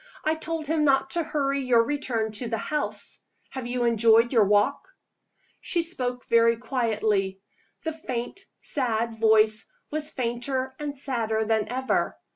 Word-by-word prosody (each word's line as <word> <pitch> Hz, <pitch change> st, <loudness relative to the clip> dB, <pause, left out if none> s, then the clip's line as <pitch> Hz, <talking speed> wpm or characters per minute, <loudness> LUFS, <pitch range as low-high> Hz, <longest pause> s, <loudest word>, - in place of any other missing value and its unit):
"I 310 Hz, -, +3 dB
told 320 Hz, 0 st, -4 dB
him 310 Hz, +1 st, +1 dB
not 270 Hz, -2 st, +3 dB
to 345 Hz, -, 0 dB
hurry 275 Hz, -3 st, -1 dB
your 240 Hz, -2 st, +4 dB
return 235 Hz, -5 st, -1 dB
to 225 Hz, +3 st, -3 dB
the 225 Hz, -, -1 dB
house. 300 Hz, +7 st, -3 dB, 0.3 s
Have 260 Hz, -2 st, -5 dB
you 245 Hz, 0 st, -1 dB
enjoyed 230 Hz, +1 st, +4 dB
your 225 Hz, -4 st, +5 dB
walk?" 205 Hz, +7 st, +2 dB, 0.7 s
She 340 Hz, -2 st, -1 dB
spoke 250 Hz, -7 st, -3 dB
very 230 Hz, 0 st, +4 dB
quietly. 215 Hz, -6 st, 0 dB, 0.4 s
The 320 Hz, -, -2 dB
faint, 255 Hz, 0 st, -5 dB, 0.2 s
sad 230 Hz, -4 st, -1 dB
voice 220 Hz, -1 st, +4 dB, 0.2 s
was 305 Hz, 0 st, -1 dB
fainter 255 Hz, +2 st, -2 dB
and 290 Hz, -1 st, -4 dB
sadder 225 Hz, -5 st, -1 dB
than 220 Hz, -1 st, +1 dB
ever. 260 Hz, +2 st, -1 dB
245 Hz, 145 wpm, -26 LUFS, 225-280 Hz, 0.7 s, your